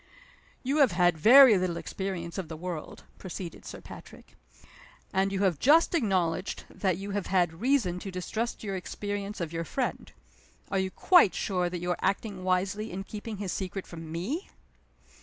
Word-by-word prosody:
"You 275 +3 0
have 270 - +5
had 175 -1 +3
very 240 - +8
little 180 -2 -1
experience 185 -1 -4
of 185 - -4
the 160 0 -7
world," 170 -2 -6 0.2
proceeded 180 -2 -7
Sir - - -8
Patrick. - - -13 0.8
"And 195 +1 +2
you 195 0 -1
have 180 -6 +1
just 315 +7 +5
acknowledged 190 - 0
that 185 -4 0
you 200 +1 -6
have 200 -1 -2
had 175 -2 +1
reason 235 -9 +2
to 195 - -6
distrust 215 +7 -4
your 200 -2 -3
experience 205 +2 -5
of 170 -2 -4
your 165 0 -2
friend. 255 - -3 0.6
Are 195 - +1
you 190 0 0
quite 345 - +5
sure 180 -3 0
that 175 -1 -5
you 175 0 -1
are - - -2
acting 195 -1 -1
wisely 185 +4 0
in 190 +2 -4
keeping 210 +1 -7
his 195 -2 -3
secret 190 0 -4
from 165 -2 -9
_me? 215 - -3
190 Hz, 175 wpm, -28 LUFS, 175-210 Hz, 0.8 s, very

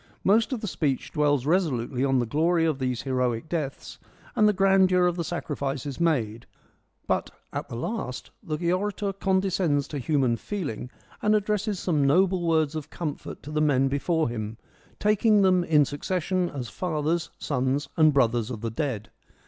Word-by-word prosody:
Most 220 +5 +3
of 250 -4 -2
the 215 - -3
speech 145 -7 -1
dwells 145 -4 +1
resolutely 140 -7 0
on 135 -1 +2
the 120 - +1
glory 165 +7 +2
of 155 -4 0
these 125 -2 -2
heroic 125 -1 -1
deaths 155 -4 -4 0.4
and 215 -3 +5
the - - +5
grandeur 190 -2 +4
of 175 -1 +1
the 170 - -2
sacrifices 140 -4 -4
made, 120 -10 0 0.6
but - - 0 0.2
at - - -4
the - - -6
last 125 - -4
the 165 +3 -1
orator 200 +1 -1
condescends 190 -7 +1
to 145 - -4
human 130 -3 +1
feeling 145 - -4 0.3
and 210 0 +3
ad 210 -2 +1
dresses 210 -2 -1
some 155 -6 +1
noble 185 +5 +3
words 160 -2 +2
of 155 -1 -5
comfort 155 -4 -6
to 150 - -8
the 155 0 0
men 135 -3 +3
before 160 +4 +1
him, 110 -2 -5 0.4
taking 210 0 +4
them 185 -2 +4
in 150 -4 +4
succession 180 +5 -1
as 130 -4 -5
fathers, 160 - -1
sons, 140 +1 -1
and 155 -1 +5
brothers 120 -4 +2
of 115 -4 -6
the 115 -1 -3
dead. 115 -4 -3
155 Hz, 170 wpm, -26 LUFS, 135-185 Hz, 0.6 s, and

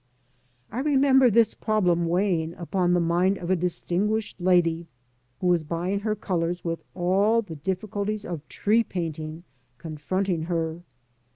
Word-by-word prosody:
I 230 - -3
remember 265 -2 +4
this 225 0 +4
problem 180 -6 +1
weighing 170 -2 0
upon 175 0 0
the 175 - +3
mind 175 +3 +2
of 180 0 -4
a - - +5
distinguished 185 +4 -1
lady, 170 -2 +2 0.5
who - - -4
was 175 -2 +3
buying 175 +5 -2
her 215 +1 -1
colours 175 -4 -2
with 165 -1 -2
all 200 +6 +2
the 170 -6 -8
diffi 185 +6 -3
culties 205 +1 -3
of 160 -4 -6
tree 220 +3 +2
painting 160 -4 -5 0.3
confronting 165 +3 -2
her. 165 -1 -2
180 Hz, 145 wpm, -25 LUFS, 170-205 Hz, 0.5 s, a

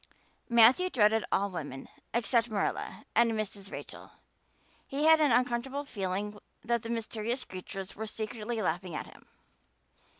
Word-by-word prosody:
Matthew 240 +10 +6
dreaded 220 -5 +3
all 200 0 +1
women 145 -6 -6 0.2
except 235 0 +2
Marilla 205 -2 -2
and 230 -1 +5
Mrs. 205 -2 -4
Rachel; - - -8 0.7
he 280 +2 -2
had 320 0 +7
an 295 -4 +4
uncomfortable 250 +4 +1
feeling 205 -1 -3 0.2
that 235 0 +1
the 230 - -7
mysterious 230 +2 -2
creatures 190 +1 -7
were 220 +1 -4
secretly 220 +1 -4
laughing 175 0 -2
at - - -3
him. - - -16
225 Hz, 135 wpm, -30 LUFS, 200-240 Hz, 0.7 s, had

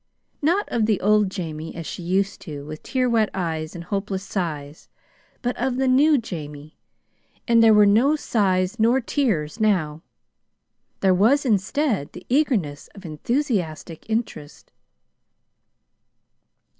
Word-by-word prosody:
Not 350 +8 +1
of 225 -2 0
the 215 -4 +1
old 210 0 +3
Jamie, 165 -4 -6
as 165 -1 -6
she 165 - -6
used 190 +3 -1
to, 145 -4 -8
with 155 +1 -8
tear 255 -1 -1
wet 225 -3 +2
eyes 160 -3 -3
and 170 - -7
hopeless 195 +1 -3
sighs, 155 -7 -5 0.5
but 245 0 -1
of 255 0 -1
the 265 0 +1
new 285 +4 +5
Jamie 155 - -7 0.7
and 230 -1 +5
there 225 -1 +6
were 210 0 +6
no 235 +9 +4
sighs 195 -6 0
nor 235 +4 +4
tears 225 - -1
now. 170 -8 +1 1.0
There 190 -1 +4
was, 235 +10 +3
instead, 215 - 0
the 180 - -11
eagerness 240 - 0
of 195 -2 -12
enthusiastic 175 - -3
interest. 220 -10 -4
200 Hz, 130 wpm, -23 LUFS, 165-240 Hz, 1.0 s, there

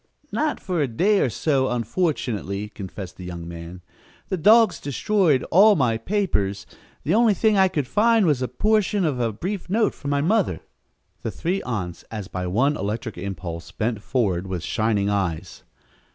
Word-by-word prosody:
"Not 305 -1 -1
for 180 -4 -2
a 140 - +1
day 195 - +2
or - - +2
so, 135 +1 +1
unfortunately," 115 - -2
confessed 95 -2 -8
the 90 - -9
young 85 -2 -7
man. 85 +1 -9 0.5
"The 190 - 0
dogs 215 +4 +5
destroyed 150 0 +1
all 205 +5 +7
my 125 -6 +2
papers. 110 - -1 0.4
The 160 - +1
only 225 -1 +4
thing 215 0 +3
I 190 -1 +5
could 150 -6 -2
find 220 - +3
was 145 -6 +2
a 125 - 0
portion 210 - +1
of 140 -5 -1
a 115 -2 0
brief 180 - -5
note 215 +2 +2
from 140 - -6
my 140 0 +1
mother." 210 +9 +1 0.6
The - - -3
three 185 +4 -2
aunts, 90 -8 -4
as 105 -4 -6
by 90 -1 -4
one 130 +11 +2
electric 110 +2 -3
impulse, 85 -3 -6
bent 110 +2 -2
forward 95 -8 -1
with 90 -3 -4
shining 110 -2 0
eyes. 95 -6 -2
125 Hz, 170 wpm, -23 LUFS, -, 0.6 s, all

